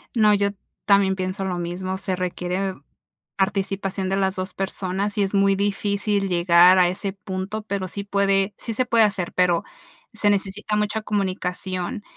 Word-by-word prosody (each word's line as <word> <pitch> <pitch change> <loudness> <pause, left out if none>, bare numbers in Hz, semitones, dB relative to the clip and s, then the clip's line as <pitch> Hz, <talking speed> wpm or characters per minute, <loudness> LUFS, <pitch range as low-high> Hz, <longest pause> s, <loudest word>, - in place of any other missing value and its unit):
No, 215 -2 +5
yo 200 0 +2 0.4
también 200 -2 +4
pienso 185 +1 -2
lo 180 -2 -2
mismo, 180 +2 -4
se 190 -1 -2
requiere 180 +1 -2 0.6
participación 195 -1 -1
de 195 - 0
las 190 -1 0
2 185 0 -4
personas 195 +1 -3
y 205 - +3
es 195 - -2
muy 195 0 +3
difícil 200 0 0
llegar 175 0 +5
a 180 -1 +5
ese 195 +1 -3
punto, 200 +1 -5
pero 200 -2 -3
sí 200 +2 -4
puede, 200 0 +1
sí 230 - -4
se 255 +3 0
puede 230 -2 +5
hacer, 190 -4 -2
pero 180 -2 +2 0.5
se 220 -2 +2
necesita 205 +1 -1
mucha 210 +1 0
comunicación 190 -1 -3
195 Hz, 165 wpm, -23 LUFS, 185-205 Hz, 0.6 s, No